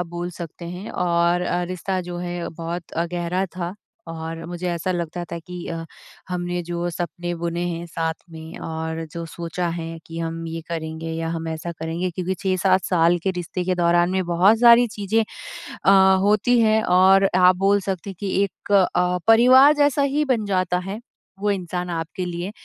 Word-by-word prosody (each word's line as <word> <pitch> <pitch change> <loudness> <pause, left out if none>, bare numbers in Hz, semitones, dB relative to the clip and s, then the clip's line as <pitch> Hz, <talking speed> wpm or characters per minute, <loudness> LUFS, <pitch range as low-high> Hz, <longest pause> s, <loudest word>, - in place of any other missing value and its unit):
आप 175 - -2
बोल 175 +1 -5
सकते 170 +1 -7
हैं। 180 +5 -7
और 175 0 +1
अ, 175 0 -1
रिश्ता 185 +1 -3
जो 175 -1 -6
है 175 -1 -4
बहुत 165 +1 -6
अ, 165 +1 0
गहरा 175 +2 -1
था 175 +1 -4 0.4
और 165 0 -6
मुझे 175 +1 -4
ऐसा 175 +2 -1
लगता 175 0 -3
था 170 - -3
कि 180 +1 -8
अ, 165 -1 -4 0.4
हमने 175 0 -2
जो 175 +1 -3
सपने 175 +1 -4
बुने 170 0 -2
हैं 170 0 -4
साथ 165 -1 -2 0.2
में 160 0 -9
और 160 0 -4
जो 170 0 -5
सोचा 170 +1 -4
है 165 -1 -5
कि 165 0 -7
हम 165 0 -4
ये 165 0 -5
करेंगे 160 0 -4
या 165 0 -3
हम 165 -1 -4
ऐसा 160 +2 -4
करेंगे। 165 +3 -3
क्योंकि 185 +2 -3
6-7 185 0 +1
साल 175 -1 +3
के 190 - +2
रिश्ते 180 0 -4
के 185 0 +1
दौरान 175 0 +3
में 190 -1 0
बहुत 185 +6 +4
सारी 240 0 +7
चीजें 210 +2 +1 0.6
अ, - - +7 0.3
होती 215 +4 +3
हैं 220 -1 +4
और 190 +2 +5
आप 180 0 +6
बोल 200 +2 +3
सकते 190 0 -4
हैं 190 - -7
कि 200 -2 -3
एक 200 +1 -6 0.2
अ, 180 0 +2
परिवार 255 +6 +7
जैसा 290 -1 +3
ही 300 - +2
बन 235 -6 0
जाता 185 -2 0
है, 200 +3 -5 0.4
वो 205 +1 0
इंसान 180 -2 -3
आपके 170 +3 -4
लिए। 175 +2 -4
175 Hz, 190 wpm, -22 LUFS, 170-190 Hz, 0.6 s, सारी